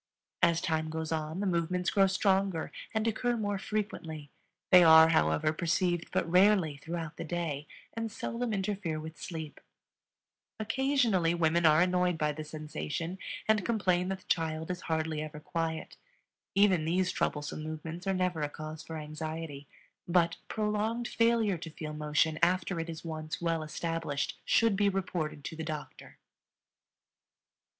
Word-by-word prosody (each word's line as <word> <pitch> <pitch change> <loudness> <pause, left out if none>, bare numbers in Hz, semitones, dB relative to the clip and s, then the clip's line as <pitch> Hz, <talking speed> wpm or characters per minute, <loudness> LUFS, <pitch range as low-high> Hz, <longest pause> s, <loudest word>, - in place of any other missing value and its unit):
As 170 -1 +4
time 160 -1 0
goes 160 0 -4
on 160 +3 -2
the - - 0
movements 180 0 0
grow 195 -1 +5
stronger 190 -3 +1 0.2
and 220 0 0
occur 240 +2 0
more 205 -2 -1
frequently; 160 -9 -4 0.4
they 180 -2 +9
are, 160 0 +9
however, 80 - +2
perceived 175 +1 0
but - - 0
rarely 180 -4 +4
throughout 165 +1 -5
the - - -4
day 155 -3 -3 0.3
and 225 -1 -3
seldom 235 +3 -3
interfere 190 -5 -2
with 160 +1 -9
sleep. 160 -4 -6 1.0
Occasionally 225 -7 +2
women 170 0 +3
are 155 +1 +6
annoyed 180 -1 +1
by 150 -1 +1
the 155 +1 -6
sensation 155 +3 -5 0.3
and 215 -2 +3
complain 185 -6 +1
that 190 -1 -3
the - - -24
child 160 0 -1
is 180 - -5
hardly 160 -1 -1
ever 155 0 -6
quiet. 160 +1 -3 0.6
Even 195 -5 +4
these 180 +3 +1
troublesome 150 +1 -2
movements 160 +3 -6
are 195 - +2
never 180 -3 0
a 145 - 0
cause 155 +1 -7
for 160 +1 -7
anxiety; 155 -1 -6 0.4
but 170 -1 +3
prolonged 215 +2 -1
failure 230 -5 +2
to 165 - -7
feel 155 -1 -6
motion 150 +1 +1
after 180 +1 +2
it 165 +1 -4
is 165 0 -7
once 155 -1 -4
well 165 -1 0
established 160 -2 -3
should 230 -3 +4
be 200 0 +3
reported 180 -6 -3
to 160 - -5
the 160 - -5
doctor. 155 -2 -7
165 Hz, 150 wpm, -31 LUFS, 155-190 Hz, 1.0 s, they